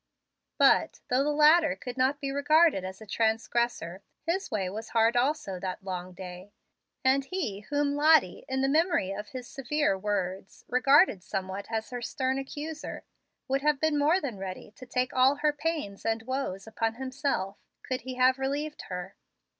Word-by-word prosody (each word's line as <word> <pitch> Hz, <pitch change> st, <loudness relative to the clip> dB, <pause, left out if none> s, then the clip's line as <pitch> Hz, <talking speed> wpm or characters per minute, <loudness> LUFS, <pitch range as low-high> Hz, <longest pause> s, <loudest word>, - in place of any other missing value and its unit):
But, -, -, +4 dB
though 255 Hz, +2 st, +3 dB
the 295 Hz, -, 0 dB
latter 305 Hz, 0 st, +5 dB
could 255 Hz, -4 st, -7 dB
not 265 Hz, +3 st, +1 dB
be 275 Hz, -1 st, -3 dB
regarded 290 Hz, -, +4 dB
as 185 Hz, +2 st, -7 dB
a -, -, -9 dB
transgressor, 220 Hz, -4 st, -1 dB, 0.2 s
his 360 Hz, +4 st, -1 dB
way 205 Hz, -7 st, -1 dB
was 220 Hz, +4 st, -6 dB
hard 225 Hz, +1 st, +4 dB
also 245 Hz, -7 st, 0 dB
that 185 Hz, +1 st, -5 dB
long 185 Hz, -1 st, -5 dB
day; 180 Hz, +2 st, -9 dB, 0.5 s
and 270 Hz, +1 st, +4 dB
he 290 Hz, -, -3 dB
whom 290 Hz, 0 st, +1 dB
Lottie, 295 Hz, -, +4 dB
in 265 Hz, 0 st, 0 dB
the 270 Hz, -, +2 dB
memory 315 Hz, -, +2 dB
of 205 Hz, +1 st, -5 dB
his 250 Hz, +2 st, -8 dB
severe 275 Hz, -2 st, 0 dB
words, 190 Hz, -1 st, -3 dB
regarded 270 Hz, -, +4 dB
somewhat 190 Hz, +2 st, -4 dB
as 225 Hz, 0 st, -3 dB
her 245 Hz, -1 st, -4 dB
stern 260 Hz, +2 st, -1 dB
accuser, 300 Hz, +3 st, -6 dB, 0.4 s
would 270 Hz, +1 st, 0 dB
have 300 Hz, -1 st, +2 dB
been 315 Hz, 0 st, +2 dB
more 300 Hz, +5 st, +3 dB
than 250 Hz, -, -5 dB
ready 190 Hz, +1 st, -7 dB
to 255 Hz, +3 st, -13 dB
take 250 Hz, 0 st, -1 dB
all 260 Hz, +2 st, +5 dB
her 295 Hz, 0 st, +1 dB
pains 295 Hz, -9 st, -3 dB
and 225 Hz, 0 st, -1 dB
woes 260 Hz, -6 st, -3 dB
upon 225 Hz, 0 st, -2 dB
himself, 260 Hz, -6 st, -2 dB, 0.3 s
could 255 Hz, 0 st, -3 dB
he 255 Hz, 0 st, -6 dB
have 255 Hz, +1 st, +4 dB
relieved 290 Hz, +3 st, -2 dB
her. 180 Hz, +1 st, -5 dB
255 Hz, 170 wpm, -28 LUFS, 200-290 Hz, 0.5 s, latter